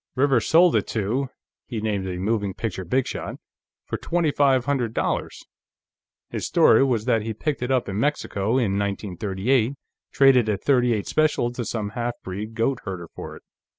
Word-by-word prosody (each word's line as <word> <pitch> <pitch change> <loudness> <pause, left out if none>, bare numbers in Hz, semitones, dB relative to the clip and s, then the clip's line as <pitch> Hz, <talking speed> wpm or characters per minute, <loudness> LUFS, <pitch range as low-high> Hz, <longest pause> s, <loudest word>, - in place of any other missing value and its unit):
"Rivers 135 -3 +2
sold 170 +1 +5
it - - +1
to," 120 +6 -1 0.4
he 115 -4 -4
named 105 -3 -2
a 90 -1 -4
moving 100 0 -1
picture 105 -4 -4
bigshot 125 +9 -2 0.5
"for - - -3
twenty 170 -3 0
five 135 -3 +3
hundred 125 -5 -1
dollars. - - -2 0.9
His - - -3
story 110 - +5
was 120 -5 0
that 115 -3 +2
he 110 0 -4
picked 150 +3 -2
it 125 - -2
up 130 -2 +1
in 100 +1 -3
Mexico, 115 -5 0
in 100 -6 +1
1938; 105 +5 -1 0.4
traded 130 -5 +5
a 105 - +1
.38 120 -2 +2
special 155 -6 +1
to 120 0 -4
some 110 -2 -3
halfbreed 110 -2 -5
goat 115 +3 0
herder 90 -4 -6
for - - -8
it." - - -14
115 Hz, 165 wpm, -24 LUFS, 105-130 Hz, 0.9 s, sold